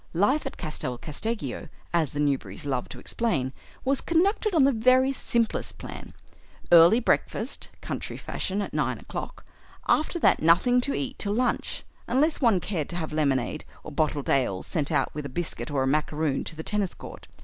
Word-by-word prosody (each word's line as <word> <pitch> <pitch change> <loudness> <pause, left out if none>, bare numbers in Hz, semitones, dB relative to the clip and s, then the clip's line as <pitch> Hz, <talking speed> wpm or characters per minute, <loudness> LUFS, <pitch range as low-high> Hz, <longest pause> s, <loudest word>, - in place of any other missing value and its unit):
Life 265 - +2
at - - -7
Castel 150 -6 -3
Casteggio, 150 - -4 0.2
as 160 -5 +2
the 145 - -5
Newberrys 135 -8 -1
loved 130 -3 -2
to - - -8
explain, 135 - -1 0.3
was 270 +1 +2
conducted 390 +4 +1
on 305 - +6
the 275 - +5
very 255 +3 +4
simplest 235 -4 0
plan. - - -9 0.6
Early 170 +6 +8
breakfast, 235 +1 -1
country - - -5
fashion, 200 +2 -2
at - - -7
nine - - 0
o'clock; - - -7 0.4
after 310 +3 +2
that - - +3
nothing 180 +11 +4
to 275 +3 0
eat 270 -1 -3
till 205 0 0
lunch, 250 +1 -1 0.2
unless 295 +7 +2
one 225 -7 +4
cared 170 -5 -3
to 175 - -5
have 160 -3 -3
lemonade 140 -2 0 0.2
or 155 - -8
bottled 150 -1 0
ale 120 -9 +1
sent 150 -4 -1
out - - +1
with 150 -1 -4
a - - -10
biscuit 165 +3 -3
or 140 -2 0
a - - 0
macaroon 150 0 0
to 165 - -5
the 160 - -6
tennis 205 -2 -1
court. - - -10
175 Hz, 180 wpm, -26 LUFS, -, 0.6 s, Early